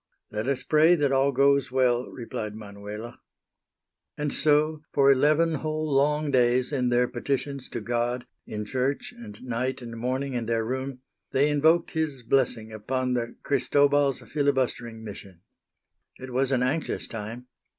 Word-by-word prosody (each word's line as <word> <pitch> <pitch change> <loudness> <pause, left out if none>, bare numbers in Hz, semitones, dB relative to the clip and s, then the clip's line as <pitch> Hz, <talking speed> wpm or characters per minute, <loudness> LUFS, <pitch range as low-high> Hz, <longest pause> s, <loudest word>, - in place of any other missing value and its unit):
"Let 105 +3 -3
us 135 -2 -1
pray 160 +3 +5
that 145 -4 +1
all 135 +1 +3
goes 140 0 +3
well," 125 -1 +2
replied 110 -3 -6
Manuela. 105 +2 -8 1.0
And 150 -1 -2
so 150 +1 +2
for 140 -1 +5
eleven 155 +5 +3
whole 155 0 -2
long 150 +2 +2
days, 125 +1 +2
in 125 -3 +1
their 125 0 +3
petitions 135 +2 -3
to 120 - -4
God, 120 +2 -1 0.2
in 105 0 -4
church 135 - -2
and 235 -3 -10
night 130 +1 -2
and 120 -2 -8
morning 130 +4 -2
in 120 -2 -2
their 115 -1 0
room, 130 +1 -4 0.3
they 140 +3 +3
invoked 160 +4 +3
His 155 -6 -2
blessing 115 -3 +1
upon 125 +4 -2
the 120 -1 -2
Cristobal's 140 0 +2
filibustering 130 -5 -1
mission. 100 -4 -10 0.8
It 130 -1 -9
was 135 +1 +1
an 125 -2 +2
anxious 145 +6 -1
time. 115 +2 -7
130 Hz, 150 wpm, -26 LUFS, 120-145 Hz, 1.0 s, pray